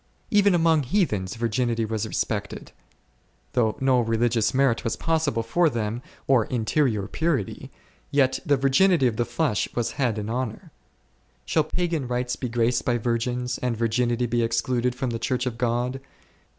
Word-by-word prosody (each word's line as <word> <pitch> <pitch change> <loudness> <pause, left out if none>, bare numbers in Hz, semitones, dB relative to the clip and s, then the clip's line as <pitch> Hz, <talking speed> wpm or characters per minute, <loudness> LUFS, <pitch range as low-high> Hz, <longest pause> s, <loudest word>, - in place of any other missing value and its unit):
Even 205 -2 +4
among 165 -2 +3
heathens 120 - 0
virginity 115 0 0
was 110 0 -2
respected; 105 -1 -3 0.8
though 115 -4 +1
no 130 -2 +3
religious 115 -1 +1
merit 130 -3 +2
was 115 - -1
possible 155 -8 0
for 165 +9 +2
them, 115 -2 -3 0.2
or 125 -5 +3
interior 115 -2 0
purity, 155 - -2 0.4
yet 135 -2 +2
the 145 -5 +2
virginity 140 +4 +3
of 115 -3 +1
the 120 - +1
flesh 145 -9 0
was 120 -1 -1
had 125 -6 -1
in 105 0 -4
honour. 120 0 -4 0.7
Shall 155 -2 +1
pagan 165 -4 -2
rites 125 0 -1
be 125 - -4
graced 120 +1 +1
by 120 -1 +1
virgins, 120 +1 -2
and 125 -2 -1
virginity 120 +1 +1
be 120 0 0
excluded 120 +2 0
from 125 -1 -2
the 115 - -3
Church 125 +1 -1
of 120 -2 -4
God 125 +2 -1
125 Hz, 155 wpm, -25 LUFS, 115-135 Hz, 0.8 s, Even